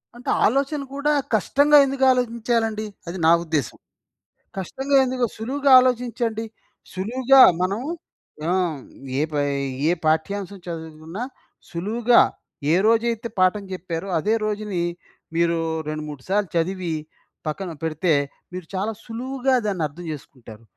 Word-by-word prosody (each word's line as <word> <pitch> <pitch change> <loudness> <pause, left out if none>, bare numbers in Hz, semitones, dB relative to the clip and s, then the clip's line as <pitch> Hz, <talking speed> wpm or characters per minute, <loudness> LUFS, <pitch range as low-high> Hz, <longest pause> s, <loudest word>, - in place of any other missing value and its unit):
అంటే 245 - -7 0.2
ఆలోచన 275 +5 +1
కూడా 290 +1 +1 0.2
కష్టంగా 285 +8 +4
ఎందుకు 270 0 -2
ఆలోచించాలండి, 230 -3 0 0.2
అది 170 +2 -5
నా - - +7
ఉద్దేశం. 155 -7 -2 0.8
కష్టంగా 270 +9 0
ఎందుకు? 255 -1 0
సులువుగా 275 +5 0
ఆలోచించండి. 240 -3 -1 0.5
సులువుగా 255 +8 +4 0.2
మనం 195 +5 -1 0.7
ఆ! - - +2 0.7
ఏ - - +3
పై 145 -1 0 0.5
ఏ - - +4
పాఠ్యాంశం 190 +5 -1
చదువుకున్నా 160 +4 -6 0.5
సులువుగా 225 +7 +3 0.5
ఏ - - +5
రోజైతే 230 +1 +2
పాఠం 185 +3 +3
చెప్పారో 180 0 -5
అదే 210 +7 +1
రోజుని 210 -3 -2 0.6
మీరు 170 0 +2 0.3
రెండు 155 0 -3
మూడు 145 -3 -8
సార్లు 200 0 +1
చదివి 175 0 -1 0.5
పక్కన 175 +4 -3
పెడితే, 160 +1 +1 0.4
మీరు 180 -2 -6
చాలా 195 +4 -1
సులువుగా 260 +3 -1
దాన్ని 195 -5 -1
అర్థం 165 +5 -11
చేసుకుంటారు. 120 -6 -11
205 Hz, 120 wpm, -23 LUFS, 170-245 Hz, 0.8 s, నా